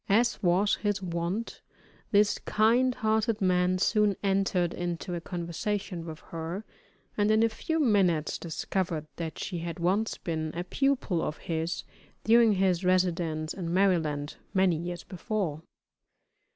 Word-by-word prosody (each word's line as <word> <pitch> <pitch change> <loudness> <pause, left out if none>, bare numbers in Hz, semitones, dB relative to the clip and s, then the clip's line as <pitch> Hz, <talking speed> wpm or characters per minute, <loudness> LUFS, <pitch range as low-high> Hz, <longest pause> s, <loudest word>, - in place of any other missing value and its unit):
As 235 +4 +3
was 185 +3 +3
his 205 -2 0
wont, 180 +4 -3 0.5
this 205 0 +3
kind 240 +4 +3
hearted 220 0 +1
man 180 -1 +2
soon 210 +1 +2
entered 195 -3 +1
into 175 +1 -4
a 170 - -3
conversation 175 +1 -3
with 160 -1 -8
her, 165 +5 -4 0.5
and 205 0 +2
in 215 +1 +4
a 230 - +4
few 320 +9 -2
minutes 190 - +2
discovered 170 -1 -2
that 165 -2 -4
she 175 -3 -4
had 165 -1 -5
once 190 +6 0
been 160 -2 -3
a 175 - -2
pupil 245 -4 0
of 150 - -3
his 165 0 -3 0.4
during 230 -1 +6
his 185 -2 +1
residence 170 -4 +1
in 170 -3 -4
Maryland 160 -6 +1 0.2
many 190 -2 +4
years 175 +2 -5
before. 185 -5 -3
185 Hz, 140 wpm, -28 LUFS, 170-210 Hz, 0.5 s, during